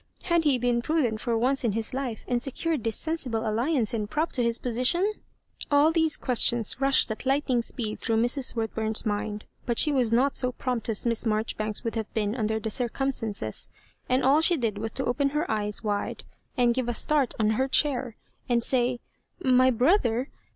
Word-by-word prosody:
had 340 -2 +1
he 280 -4 +4
been 240 -1 +1
prudent 240 -7 0
for 235 -2 0
once 260 +4 +1
in 235 - +2
bis 225 +3 -3
life, 255 -4 -4
and 245 -1 0
secured 285 +1 -2
this 225 -2 -1
sensible 255 -9 -2
alliance 235 +2 0
and 210 -2 -2
prop 315 +7 -1
to 250 - 0
his 235 -1 +1
position 255 - 0
f - - -30 0.5
All 290 +2 +4
these 320 -2 +2
questions 240 -1 +2
rushed 275 -4 +3
at 220 - -5
lightning 270 -2 +1
speed 225 -2 -3
through 225 -2 0
Mrs. 245 +3 +1
Woodbum's 220 -1 -2
mind; 210 0 -3 0.2
but 235 -2 0
she 300 - +4
was 250 -5 +1
not 260 +4 +2
so 250 -1 +1
prompt 250 -3 -3
as 220 +1 0
Miss 230 -1 0
Mar 215 0 +1
joribanks 215 -1 -3
would 230 - -3
have 220 -2 -4
been 210 -1 0
und, 220 -3 -1
er 220 - 0
the 220 0 -4
circum 260 +4 -1
stances, 205 - -3 0.4
and 255 +1 +2
all 280 +4 +4
she 345 +1 +3
did 220 -6 -2
was 220 +1 -2
to 265 - -2
open 275 +3 +1
her 300 +2 -1
eyes 210 +1 -1
wide, 205 -1 -3 0.3
and 240 -1 +3
give 250 -1 -2
a 240 - -2
start 285 0 +1
on 215 0 +2
h&r 260 +5 +1
chair, 260 -4 +1 0.3
and 235 -1 +2
say, 245 -1 +1 0.2
" - - -46 0.2
My 255 0 +5
brother 250 - +2
245 Hz, 205 wpm, -26 LUFS, 225-270 Hz, 0.5 s, My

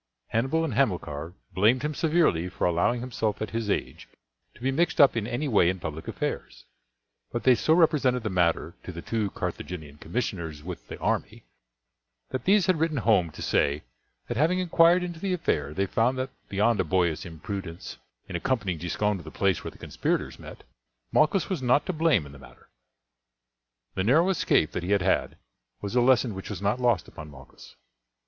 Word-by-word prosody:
Hannibal 135 +8 +1
and 145 - -3
Hamilcar 90 - -1 0.2
blamed 110 +8 +3
him 150 +1 -1
severely 155 - +2
for - - -2
allowing 90 +8 +1
himself 115 -4 -2
at 110 - -4
his 115 -2 -2
age - - -3 0.5
to - - -18
be 130 +2 +1
mixed 170 +6 0
up 140 -4 +7
in 110 -2 -1
any 145 +6 -2
way 105 -9 +4
in 95 0 -2
public 80 -1 -6
affairs; - - -4 0.7
but 120 - -3
they 130 - +6
so 155 +7 +3
represented 135 -7 +3
the 110 - -2
matter 85 -2 +1
to - - -7
the 85 -1 -8
two 110 -3 -1
Carthaginian 80 -6 -6
commissioners 85 -7 -4
with 85 -9 -8
the - - -7
army, - - -2 0.9
that 130 - -4
these 200 -1 +4
had 185 -4 +2
written 160 -2 0
home 105 -8 +3
to - - -8
say, 70 +1 +1 0.4
that 120 - -3
having 165 +6 +3
inquired 175 0 +4
into 175 -2 -5
the 190 +1 -1
affair 75 - -1
they 95 +6 0
found 115 +6 +1
that 130 +1 -3 0.2
beyond 105 +2 +2
a - - +3
boyish 85 -2 +1
imprudence 85 +1 -7 0.3
in - - -6
accompanying 100 - -1
Giscon 100 +5 -1
to 90 - -10
the - - -9
place 95 -4 0
where - - -4
the - - -16
conspirators - - -2
met, - - -11 0.5
Malchus 160 +5 +3
was 185 -7 -2
not 125 +3 +3
to 185 - -2
blame 155 - +2
in 70 - -11
the 70 - -13
matter. - - -17 1.2
The 95 - -1
narrow 155 - +4
escape 80 - +2
that - - -3
he 90 +4 0
had 100 -3 +2
had 95 - +1 0.4
was 100 +4 -5
a 125 - +5
lesson 120 -2 +3
which 95 0 -7
was - - -5
not 100 +5 0
lost 120 -8 +2
upon 75 -1 -10
Malchus. 65 -2 -15
110 Hz, 190 wpm, -27 LUFS, 85-135 Hz, 1.2 s, up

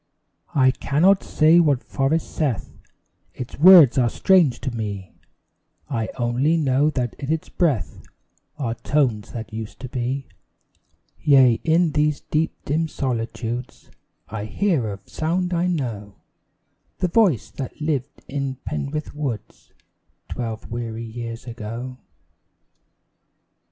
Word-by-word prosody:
I 130 -2 +5
cannot 160 +9 +3
say 160 +2 +4
what 145 -6 +3
forest 145 +4 -1
saith 140 -10 -1 0.6
Its 125 +1 -7
words 165 -6 +9
are 120 -2 +3
strange 160 - +3
to 130 - -2
me: 100 -4 -5 0.8
I 115 -4 -1
only 130 +7 +1
know 145 -1 +2
that 125 -6 -2
in 140 +1 -3
its 160 -1 -2
breath 135 - 0 0.6
Are 125 -6 -2
tones 120 -5 0
that 115 -1 -7
used 110 -1 -6
to 130 - -5
be. 130 +2 -2 0.9
Yea, 130 -5 +5
in 165 0 +3
these 150 0 +1
deep 155 +1 -1
dim 160 +3 0
solitudes 120 -3 -4 0.4
I 105 -1 -5
hear 140 - 0
a 100 - -7
sound 180 +3 -1
I 175 +1 +1
know 115 - -3 0.8
The 180 - 0
voice 180 - +2
that 135 -3 -7
lived 150 -3 -3
in 140 -1 -3
Penrith 150 +2 -4
woods 140 -7 -6 0.6
Twelve 115 -3 -5
weary 115 -1 -4
years 115 0 -7
ago. 120 +2 -6
135 Hz, 120 wpm, -23 LUFS, 115-155 Hz, 0.9 s, words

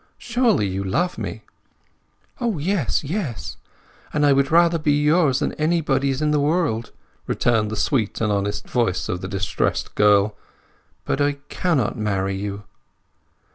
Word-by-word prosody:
Surely 240 - +1
you 95 +1 -3
love 175 - -1
me?" - - -5 1.0
"O 235 -7 -1
yes, 150 - 0
yes! 140 - -4 0.5
And 150 0 +1
I 145 - +5
would 135 0 +2
rather 170 0 +4
be 150 -1 +2
yours 150 -2 +3
than - - -1
anybody's 145 -4 +1
in 150 - +2
the 150 - +2
world," 145 -7 0 0.4
returned 110 -3 +1
the 110 - -4
sweet 110 -3 0
and 110 -1 +1
honest 100 0 -2
voice 115 -8 0
of 90 - -2
the 95 - -4
distressed 95 0 -1
girl. 105 0 +4 0.7
"But 140 - -1
I 145 0 +2 0.2
cannot 155 - 0
marry 95 -2 -1
you!" 100 +1 -5
135 Hz, 145 wpm, -22 LUFS, 105-160 Hz, 1.0 s, I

